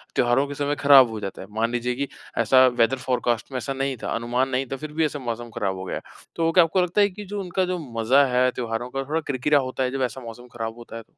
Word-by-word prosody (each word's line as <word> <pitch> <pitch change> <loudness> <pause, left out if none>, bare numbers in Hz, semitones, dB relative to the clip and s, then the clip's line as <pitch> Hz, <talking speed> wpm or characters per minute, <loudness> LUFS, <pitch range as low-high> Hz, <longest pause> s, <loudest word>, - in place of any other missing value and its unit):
त्योहारों 120 +3 +3
के 145 - -6
समय 145 +1 -1
खराब 135 -4 +7
हो 110 -1 -5
जाता 100 -2 -6
है। 95 - -9
मान 115 +2 -1
लीजिए 120 0 -1
कि 140 +1 -2 0.3
ऐसा 130 0 +5
वेदर 120 +3 +3
फ़ोरकास्ट 125 -1 -1
में 130 - -3
ऐसा 135 +2 -3
नहीं 135 0 -2
था, - - -3
अनुमान 120 +3 0
नहीं 130 +1 0
था, - - -1
फिर 155 +1 -7
भी 160 0 +2
ऐसा 145 -1 -3
मौसम 120 -1 -5
खराब 95 -2 -1
हो 95 - -6
गया। - - -4 0.4
तो 165 0 +1
क्या 175 0 +6
आपको 175 +3 +1
लगता 180 +4 +1
है 205 - +4
कि 205 +2 -9
जो 205 +1 -5
उनका 185 0 -1
जो 180 0 -2 0.2
मज़ा 135 +5 +5
है 125 +1 +4
त्योहारों 120 0 -4
का 135 +1 -3
थोड़ा 155 +4 -2
किरकिरा 140 +2 +2
होता 130 0 -2
है 125 - -1
जब 135 -1 -3
ऐसा 130 - -9
मौसम 120 +1 -10
खराब 115 +1 -4
होता 115 -1 -9
है? 115 - -8
130 Hz, 270 wpm, -24 LUFS, 120-145 Hz, 0.4 s, खराब